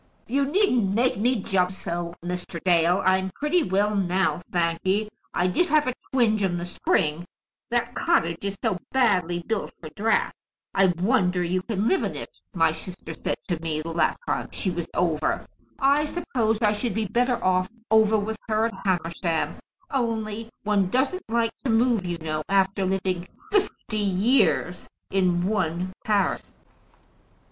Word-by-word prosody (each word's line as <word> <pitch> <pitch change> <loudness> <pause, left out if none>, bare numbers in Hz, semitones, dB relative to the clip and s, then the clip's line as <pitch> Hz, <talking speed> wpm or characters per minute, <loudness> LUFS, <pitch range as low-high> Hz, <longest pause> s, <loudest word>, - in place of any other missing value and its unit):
"You 275 +3 +1
needn't 265 - +2
make 245 0 +2
me 230 0 +1
jump 185 -1 +1
so, 175 -2 -4
Mr. 180 -1 -4
Dale. 175 +1 +3
I'm 190 0 +3
pretty 300 +5 +1
well 205 - +1
now, 185 -1 +1
thank 170 -1 0
ye. 205 +3 +1 0.2
I 175 - 0
did 185 - +2
have 305 -2 +3
a 255 - +1 0.2
twinge 225 -5 +3
in 180 -3 +1
the 175 - -4
spring, 165 -2 0 0.5
that 240 0 0
cottage 170 - +1
is 200 0 -3
so 180 - 0
badly 180 -9 +2
built 220 -2 -2
for 155 - -8
draughts! 215 +9 -1 0.3
'I 195 0 +5 0.2
wonder 185 -6 +2
you 180 +2 0
can 210 +1 -1
live 380 - +3
in - - -2
it,' - - -8 0.2
my 165 -2 +4
sister 175 +3 -8
said - - -3
to 170 -4 -2
me 155 -2 -2
the 165 0 -5
last 165 -1 +1
time - - -2
she 190 - -2
was 170 -1 -3
over. 160 -3 0 0.3
I 280 +2 +3
suppose 240 -10 -1
I 210 - +5
should 210 -1 -2
be 220 -1 0
better 245 +5 +1
off 185 0 +2 0.2
over 220 0 +5
with 215 +1 -2
her 215 +1 +2
at 230 - -2
Hamersham, 170 -2 -1 0.3
only 225 -3 -2
one 205 -3 +2
doesn't 265 - +1
like 230 0 +1
to 270 - -4
move, 225 -4 +2
you 175 -1 -2
know, 155 -1 -3
after 195 0 +2
living 185 -2 -1 0.2
fifty 380 - 0
years 200 -1 +2 0.2
in 180 -2 +2
one 185 -3 -1
parish." 205 -3 +1
195 Hz, 165 wpm, -25 LUFS, 180-230 Hz, 0.5 s, I